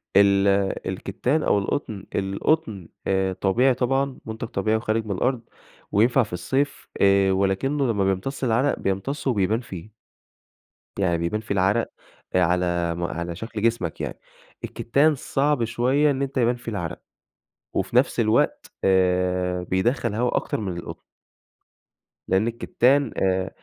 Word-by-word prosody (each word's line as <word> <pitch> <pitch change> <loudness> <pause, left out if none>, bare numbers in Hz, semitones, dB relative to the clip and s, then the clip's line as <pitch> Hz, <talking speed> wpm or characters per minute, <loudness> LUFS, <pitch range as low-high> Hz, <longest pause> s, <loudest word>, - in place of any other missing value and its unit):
ال 100 0 +5 0.4
الكِتّان 150 +5 -1
أو - - +3
القطن. 100 -1 -3
القطن 100 - -1 0.2
آآ 95 -1 +1
طبيعي 120 +8 +2
طبعًا، 135 +2 0
مُنتَج 110 0 -5
طبيعي 110 +1 0
وخارِج 110 0 -1
من 105 - -5
الأرض 120 +6 0 0.5
وينفَع 120 +5 +4
في 105 - -10
الصيف 135 +11 -2
آآ، 100 -1 +4
ولكنّه 100 +9 +1
لمّا 100 -3 0
بيمتصّ 95 +9 -2
العرَق 125 +3 +1
بيمتصّه 130 +8 -1
وبيبان 105 +1 +1
فيه. 95 -4 -9 1.1
يعني 85 -3 +2
بيبان 85 +6 -2
فيه 110 -2 -3
العرَق 100 +5 +2 0.5
آآ 90 - +4
على 85 -1 +1
م 85 - -4
على 85 0 -3
شكْل 110 +3 -6
جسمك 115 -7 0
يعني. - - -5 0.4
الكِتّان 145 +6 +2
صعب 140 -1 0
شوية 130 +6 +2
إن 135 -1 -2
أنت 135 0 -3
يبان 120 -1 +3
فيه 120 -1 -7
العرَق، 90 -4 -4 0.7
وفي - - -2
نفْس 125 0 +3
الوقت 110 0 +1
آآ 90 -1 +2
بيدخّل 115 +6 0
هوا 120 +2 0
أكتر - - -2
من 95 -4 -4
القطن. 85 - -8 1.3
لأن 95 +4 +2
الكتان 125 +3 +2
آآ 95 0 +1
110 Hz, 140 wpm, -24 LUFS, 95-125 Hz, 1.3 s, ال